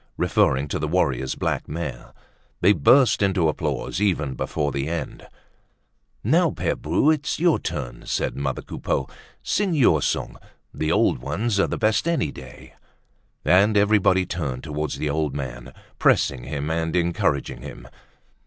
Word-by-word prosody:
referring 65 +2 +2
to 75 - -3
the 75 - -2
warrior's 65 -6 0
black - - -2
mare. 75 -5 -5 0.5
They 95 +3 +5
burst 120 - +4
into 95 -4 +2
applause 80 +4 -2
even 80 -9 +1
before 75 +3 -2
the 70 +1 -2
end. 85 -1 -5 1.0
"Now, 165 - +3
Pere - - -2
Bru, 85 - +2
it's 150 0 -1
your 170 -1 +3
turn!" - - -5
said - - -1
mother 70 -1 -3
Coupeau. 65 - -3 0.4
"Sing 195 -5 0
your 100 - +4
song. - - -2 0.4
The 80 +1 -1
old - - +2
ones 100 - -1
are - - +3
the - - -3
best 110 +7 +1
any 165 - 0
day!" 65 -1 -12 0.7
And 100 +4 +4
everybody 100 -3 +3
turned 70 -9 -4
towards 75 -1 -3
the 75 - -1
old 75 -2 -1
man, 65 -3 -6 0.3
pressing 65 -3 +2
him 75 +3 -3
and 80 0 -1
encouraging 85 -5 0
him. - - -10
80 Hz, 150 wpm, -23 LUFS, 70-100 Hz, 1.0 s, They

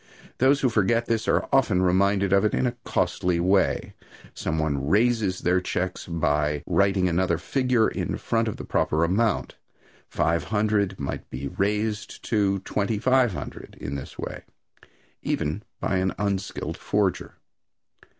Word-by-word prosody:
Those 135 +2 +4
who 130 - +3
forget 115 +1 +2
this 115 -1 -1
are - - +2
often 105 -9 +3
reminded 100 +1 +2
of 100 - +4
it 105 - +1
in - - +1
a 120 0 -1
costly 90 -1 0
way. 95 +2 +1 0.4
Some 80 - -3
one 70 -3 -1
"raises" 105 -2 +2
their 90 +1 +2
checks 90 0 -3
by 75 -3 0
writing 95 -2 +2
another 90 0 +1
figure 125 - +1
in - - -3
front 115 0 0
of 110 - -3
the - - -7
proper 80 +2 +1
amount. 100 +5 0 0.5
"Five 85 +1 0
hundred" 105 -3 0
might 70 - -5
be 70 +2 -5
"raised" 105 +3 -2
to 100 -3 +2
"twenty 105 +2 -1
five 130 -1 +3
hundred" - - -8
in 70 - -5
this 70 -2 -7
way, - - -6 0.8
even 75 +7 -2 0.2
by 95 - 0
an 95 0 0
unskilled 100 -1 -2
forger. - - -1
100 Hz, 150 wpm, -25 LUFS, 90-110 Hz, 0.8 s, Those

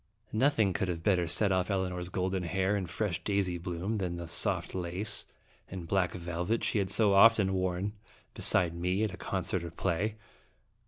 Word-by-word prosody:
Nothing 110 -4 +2
could 95 - -1
have 85 -2 -3
better 90 -4 +2
set 95 +5 +2
off 95 -1 +1
Elinor's 90 -2 -2
golden 95 0 -1
hair 95 +3 0
and 95 -4 -3
fresh. 90 -4 -2
daisy 95 -3 0
bloom 90 +5 -3
than 90 -3 -2
the 85 -1 -6
soft - - 0
laces 95 +4 -1 0.4
and 90 -3 -7
black 90 -1 +1
velvet 90 +5 -2
she 105 - +1
had 95 -1 -1
so 105 0 +3
often 100 -1 +6
worn 95 +2 -1 0.4
beside 85 -2 +3
me 90 +4 -1
at 95 -4 -3
concert 95 -1 -2
or 85 - -5
play. 95 +5 -1
95 Hz, 170 wpm, -30 LUFS, 90-100 Hz, 0.4 s, often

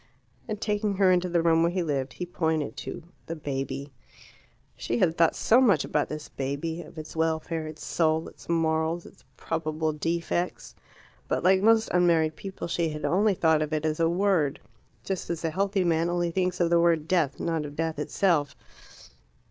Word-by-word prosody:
And 215 -2 -4
taking 210 -2 -1
her 190 -1 +4
into 180 0 +2
the 170 -1 +1
room 165 -1 +4
where 170 +1 +3
he 180 0 -1
lived, 135 -4 -2
he 180 - -5
pointed 160 -4 -1
to - - -6 0.2
the 165 - -4
baby. 140 -1 -4 0.8
She 120 - -2
had 160 +5 +2
thought 165 -1 +3
so 240 +4 +4
much 235 -7 +4
about 150 - 0
this 150 0 -6
baby, 140 +5 -4
of - - -13
its 155 +1 -8
welfare, 160 0 -1
its 155 0 -9
soul, 160 -1 +1
its - - -15
morals, 165 0 0
its 125 - -16
probable 155 -1 -2
defects. 170 +3 -2 0.5
But, - - -1
like 190 +1 +4
most 225 +1 +4
unmarried 165 -3 +3
people, 195 0 -6
she 170 -1 0
had 150 -1 -5
only 195 +6 +2
thought 160 -3 +3
of 155 0 -2
it 155 0 -1
as 155 0 -1
a 165 0 +3
word 175 -5 +1 0.4
just 190 -2 -4
as 170 -1 -3
the 165 - 0
healthy 195 +2 0
man 165 -1 +1
only 175 -1 0
thinks 180 0 -1
of 170 -1 +2
the 170 - +5
word 165 -2 +2
death, 165 -7 +1
not 165 -2 -1
of 145 -1 -8
death 160 -1 -2
itself. 150 -2 +1
165 Hz, 190 wpm, -27 LUFS, 155-180 Hz, 0.8 s, the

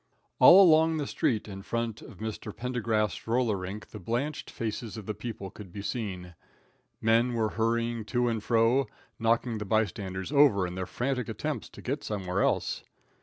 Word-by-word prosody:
All 195 +3 +10
along 160 -2 +5
the 150 - -1
street 110 -5 0
in 95 -2 -7
front 115 +1 -3
of 105 - -12
Mr. 110 0 -6
Pendergast's 115 -4 -1
roller 115 -2 +2
rink 95 +3 -6
the 110 - -9
blanched 125 - -3
faces 115 0 -4
of 105 - -7
the 110 - -3
people 105 -5 -6
could 100 -4 -11
be 100 +2 -7
seen. 95 -7 -4 0.7
Men 115 +2 +3
were 110 -2 +1
hurrying 115 +1 0
to 120 +1 +1
and 115 -3 -1
fro, 115 +3 +3 0.3
knocking 115 0 +1
the - - -3
bystanders 95 -1 -1
over 140 -10 +5
in 90 - -5
their 95 0 -4
frantic 125 0 -2
attempts - - -4
to - - -13
get - - -2
somewhere 95 -2 -2
else. - - 0
110 Hz, 170 wpm, -29 LUFS, 105-120 Hz, 0.7 s, All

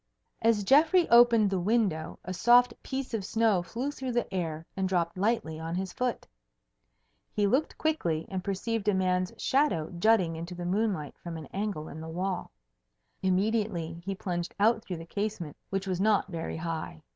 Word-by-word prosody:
As 225 -2 +3
Geoffrey 315 - +5
opened 235 -3 +6
the 190 - +1
window, 190 -5 0
a 185 - -4
soft 240 +4 +5
piece 265 -2 -4
of 220 -3 -1
snow 220 -2 +2
flew 235 +11 -3
through 260 -3 -4
the 240 -4 -1
air 165 -3 -3
and 190 -1 -1
dropped 170 -2 0
lightly 185 -6 0
on 165 +1 -4
his 185 0 -3
foot. 250 -2 -2 1.1
He 205 - +1
looked 260 +10 +1
quickly 170 - 0
and 190 -2 -4
perceived 200 +2 -2
a 205 - +4
man's 185 -1 +1
shadow 265 - +1
jutting 185 -5 +3
into 170 +2 -6
the 175 0 -5
moonlight 185 -5 -1
from 170 -2 -6
an 160 - -7
angle 195 -6 -3
in 160 - -8
the 160 - -7
wall. 180 +2 -3 0.7
Immediately 190 -3 0
he 195 +1 -3
plunged 175 -2 -4
out 220 +2 +3
through 180 - -5
the 165 - -8
casement, 200 -5 -4
which 195 0 -2
was 185 -1 -1
not 205 -2 +3
very 165 -2 -4
high. 160 - -5
190 Hz, 175 wpm, -29 LUFS, 170-225 Hz, 1.1 s, opened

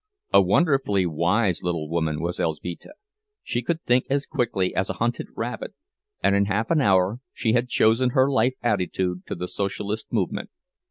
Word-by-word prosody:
A - - +8
wonderfully 135 - +2
wise 90 +4 +1
little 85 -3 -2
woman 80 -1 -1
was 85 +1 -2
Elzbieta; 85 - -4 0.5
she 120 - -2
could 165 +6 -2
think 125 +1 +2
as 140 +1 +1
quickly 120 -10 -1
as 95 - -1
a - - -1
hunted 120 +1 -2
rabbit, 115 0 -5 0.5
and 100 - +4
in 100 0 +3
half 105 +3 -1
an 160 -3 +3
hour 95 0 +3
she 110 -2 0
had 120 +1 +1
chosen 115 +3 +3
her 130 +2 +3
life 130 -1 +2
attitude 95 -4 -1
to - - -4
the 90 - -4
Socialist 100 +3 -3
movement. - - -1
105 Hz, 170 wpm, -24 LUFS, 90-125 Hz, 0.5 s, A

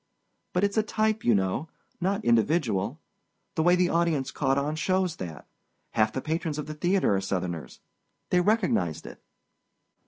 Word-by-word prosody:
But 180 - +1
it's 200 +1 +1
a - - +6
type, 215 0 0
you 120 - +4
know—not 160 - -2
individual. 120 - +2 0.5
The 160 - 0
way 175 +2 +5
the 180 -1 +2
audience 165 -6 +1
caught 135 -2 +1
on 145 +2 0
shows 185 +1 0
that. 85 -4 -7 0.4
Half 110 -1 +2
the 130 - -2
patrons 160 0 -2
of 150 - -3
that 155 0 -8
theater 180 - +3
are 95 - 0
Southerners. 90 -7 -4 0.5
They 180 - +4
recognized 180 - +1
it." - - -10
155 Hz, 155 wpm, -27 LUFS, 110-180 Hz, 0.5 s, a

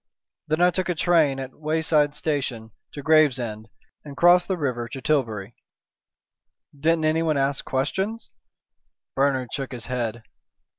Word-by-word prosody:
Then 155 +2 0
I 180 0 +5
took 185 0 -2
a 180 - 0
train 160 -5 +2
at 130 -1 -6
a - - -26
wayside 155 -1 +1
station 135 -7 -3 0.2
to 145 - -7
Gravesend, 125 -8 +2 0.3
and 140 -2 -10
crossed 175 +1 +5
the 190 - -1
river 125 -6 -2
to 135 - -7
Tilbury." 120 -7 -1 1.2
"Didn't 160 +3 +1
anyone 155 -1 +1
ask 135 0 0
questions?" 190 - -2 0.8
Bernard 135 -3 0
shook 135 -1 -4
his 120 -3 -7
head. 120 -2 -3
145 Hz, 140 wpm, -24 LUFS, 125-160 Hz, 1.2 s, I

